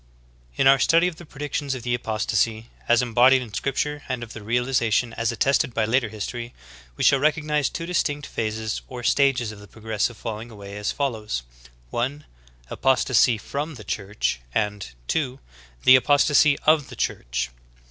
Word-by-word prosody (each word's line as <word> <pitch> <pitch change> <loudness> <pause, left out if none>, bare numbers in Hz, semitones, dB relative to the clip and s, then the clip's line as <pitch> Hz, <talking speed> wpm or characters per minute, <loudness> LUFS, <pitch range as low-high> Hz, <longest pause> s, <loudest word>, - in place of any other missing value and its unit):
16. - - -3
In - - +5
our 135 0 +6
study 165 +6 +4
of 175 -3 -5
the 175 - -12
predictions 145 -1 -3
of 125 - -7
the 120 -1 -1
apostasy 110 0 -1 0.2
as 120 +1 +4
embodied 125 +2 +4
in 110 -4 -12
scripture 145 +5 -2
and 125 -2 -2
of 115 - -9
their 110 - -8
realization 120 0 +1
as 115 0 -1
attested 130 0 +1
by 110 - +2
later 115 +1 +1
history, 115 +3 -6 0.4
we - - -2
shall 140 - +5
recognize 150 -1 +1
two^distinct 155 -4 -2
phases 110 0 -3
or 125 -1 -8
stag 135 +1 +3
es 115 -3 -3
Qf - - -12
_the 105 - -14
pro 110 +2 -17
gressi 110 -1 0
ve 120 - -10
falling 110 +1 -6
away, 100 -2 -10
as 105 0 -2
foUow^s: 110 - -2 0.5
(1.) 135 +5 -2 0.5
Apostasy 130 -3 +3
from 145 +8 -5
the 110 - -10
Church; 100 - -2
and 105 - -2
(2.) 135 -5 -1 0.5
The 130 - +9
apostasy 145 +2 +4
of 155 -2 +4
the - - -9
Church. - - -2
120 Hz, 175 wpm, -24 LUFS, 110-140 Hz, 0.5 s, The